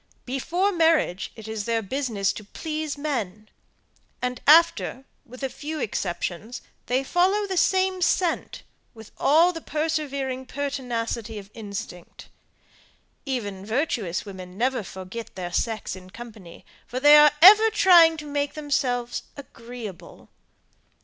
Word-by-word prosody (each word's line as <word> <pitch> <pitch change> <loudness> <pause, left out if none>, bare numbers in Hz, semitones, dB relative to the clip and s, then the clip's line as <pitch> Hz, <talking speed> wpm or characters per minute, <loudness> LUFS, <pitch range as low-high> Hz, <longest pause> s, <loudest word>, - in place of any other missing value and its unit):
Before 340 +10 -1
marriage 325 - +1
it 220 -1 -11
is 220 -2 -4
their 230 -1 0
business 215 -3 -1
to 210 - -9
please 305 +6 -5
men; 215 -8 -4 0.7
and 250 0 -3
after, 310 -4 +4 0.2
with 255 +3 -11
a - - +1
few 305 +4 -6
exceptions, 200 +1 -4 0.2
they 255 +2 +1
follow 375 +8 +1
the 385 -1 -4
same 375 +1 +1
scent, 350 -1 0 0.3
with 220 -1 -13
all 330 +5 +4
the 330 - -7
persevering 280 -5 -3
pertinacity 245 -5 -4
of 200 0 -10
instinct. 200 -5 -8 1.0
Even 205 -8 -4
virtuous 220 - -2
women 185 -2 -10
never 255 +2 0
forget 190 +4 -9
their 180 -2 -6
sex 225 -4 -2
in 185 0 -13
company, 215 -5 -12 0.2
for 250 - -4
they 290 +2 +8
are 300 0 +8
for 295 - -17
ever 425 +4 +9
trying 345 -6 +6
to 305 - -8
make 285 0 -2
themselves 250 -5 -1 0.2
AGREEABLE. 235 -7 -10
255 Hz, 130 wpm, -24 LUFS, 215-305 Hz, 1.0 s, ever